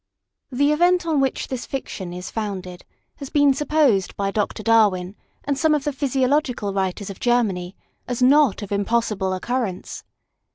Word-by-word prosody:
THE 285 +3 +2
event 350 +3 +3
on 315 -3 +1
which 270 -1 -1
this 255 -2 -5
fiction 195 -9 -5
is 180 +1 -7
founded 190 -5 -5 0.3
has 275 - -8
been 285 -2 +4
supposed, 275 -9 +1
by 195 -1 -1
Dr. 210 +1 -2
Darwin, 205 -4 +3 0.3
and 285 - -1
some 315 -2 +3
of 290 - -2
the 295 - -2
physiological 265 -5 0
writers 195 +1 -2
of 190 - -11
Germany, 200 -7 0 0.3
as 245 -1 -3
not 260 -4 +4
of 205 - -8
impossible 205 -1 0
occurrence. 195 0 -3
235 Hz, 155 wpm, -22 LUFS, 195-280 Hz, 0.3 s, been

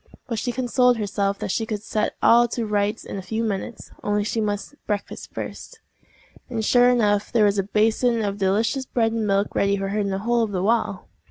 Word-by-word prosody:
But 230 -4 -2
she 245 - -2
consoled 250 0 +2
herself 200 -1 -1
that - - -3
she 225 +2 -1
could 215 -2 -4
set 210 0 -1
all 240 +1 +6
to 235 0 -3
rights 210 +1 -1
in 200 - -5
a - - -5
few 220 +4 -3
minutes—only 205 0 -3
she 225 +1 -1
must 205 +3 -3
breakfast 205 -1 -4
first. 465 - -7 0.7
And, 225 -3 -2
sure 245 +1 +5
enough, 210 -4 +2
there 225 -3 +4
was 200 0 +2
a 195 +1 -2
basin 225 +2 +2
of 200 0 -3
the 195 - +1
delicious 225 +7 0
bread 225 -2 +1
and 225 -2 -1
milk 200 +1 +1
ready 200 0 +2
for 195 0 -3
her 210 +2 -1
in 200 -1 0
the 190 - -1
hole 240 0 +2
of 215 -3 -1
the 180 -1 -1
wall! 215 -2 0
215 Hz, 220 wpm, -23 LUFS, 200-235 Hz, 0.7 s, all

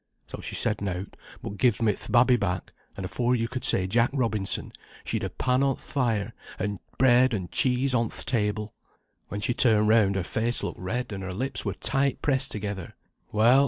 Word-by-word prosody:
So - - -8
she - - -5
said 105 -3 +1
nought, 95 -1 -4 0.3
but 100 - -6
gived 120 -3 +2
me 105 -2 +3
th' - - -9
babby 125 +1 +5
back, 95 -6 -2 0.2
and 95 - -4
afore 120 +7 0
yo' 115 -1 0
could 125 +2 -5
say 95 - +4
Jack 115 +5 +2
Robinson, 110 -7 0 0.3
she'd - - -3
a - - -2
pan 125 +1 0
on 135 -1 +2
th' - - -20
fire, 115 -8 -1 0.2
and 100 -1 -3 0.2
bread 130 -1 +4
and 95 -4 -5
cheese 130 +1 +2
on 115 -2 +1
th' - - -1
table. 105 -3 -1 0.5
When 105 - -5
she 120 - +1
turned 110 -4 +4
round, 105 -3 +4
her 95 - 0
face 115 +6 -1
looked - - -4
red, 120 +7 -3
and 95 - -5
her 95 -1 -5
lips 130 +4 -2
were 100 -1 -2
tight 135 +5 +1
pressed 135 -3 +1
together. 100 -4 -5 0.4
Well! 115 +5 +5
110 Hz, 200 wpm, -26 LUFS, 100-125 Hz, 0.5 s, babby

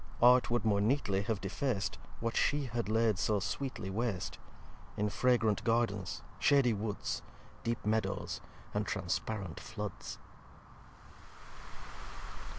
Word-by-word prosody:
Art 125 +1 +7
would 120 -2 +1
more 100 -2 +3
neatly 105 -4 +2
have 110 -1 -1
defac'd 100 +1 -1 0.2
What 115 0 -1
she 145 0 +3
had 120 -3 -2
laid 110 -2 +3
so 105 +1 +2
sweetly 115 -1 -3
wast; 105 -2 -2 0.6
In 105 0 +1
fragrant 115 -2 +3
Gardens, 115 -5 0 0.2
shaddy 135 -5 +5
Woods, 105 0 -2 0.4
Deep 115 -2 -2
Meadows, 105 -2 0 0.3
and - - 0
transparent 100 -7 -2
Floods. 105 -2 -6
110 Hz, 110 wpm, -33 LUFS, 100-120 Hz, 0.6 s, Art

